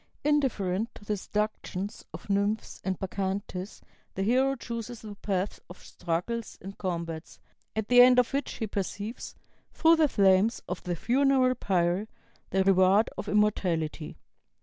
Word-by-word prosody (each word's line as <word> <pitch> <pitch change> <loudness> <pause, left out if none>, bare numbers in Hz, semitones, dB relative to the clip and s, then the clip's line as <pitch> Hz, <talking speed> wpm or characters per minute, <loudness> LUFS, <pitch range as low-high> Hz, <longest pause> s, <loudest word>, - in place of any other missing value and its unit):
"Indifferent 230 -9 +1
to 205 - -13
the 210 - 0
seductions 205 -1 -3
of 160 - -10
Nymphs 200 +2 -1
and 190 -1 -1
Bacchantes, 190 0 -4 0.3
the 195 - -1
hero 260 +5 +2
chooses 235 -1 -6
the 210 -1 -7
path 200 -1 -2
of 180 - -10
struggles 180 +6 -4
and 195 +2 -9
combats, 170 -3 -5 0.4
at 220 -1 -2
the 245 0 +7
end 250 0 +7
of 250 +1 +3
which 280 -1 -1
he 225 - -3
perceives, 205 +2 -5 0.4
through 330 0 +4
the 315 -1 +4
flames 200 +1 +3
of 180 - -4
the 175 -1 -3
funeral 255 - +3
pyre, 185 -2 0 0.4
the 190 0 +2
reward 190 +2 +4
of 210 - -5
immortality." 175 -7 0
205 Hz, 145 wpm, -28 LUFS, 185-235 Hz, 0.4 s, the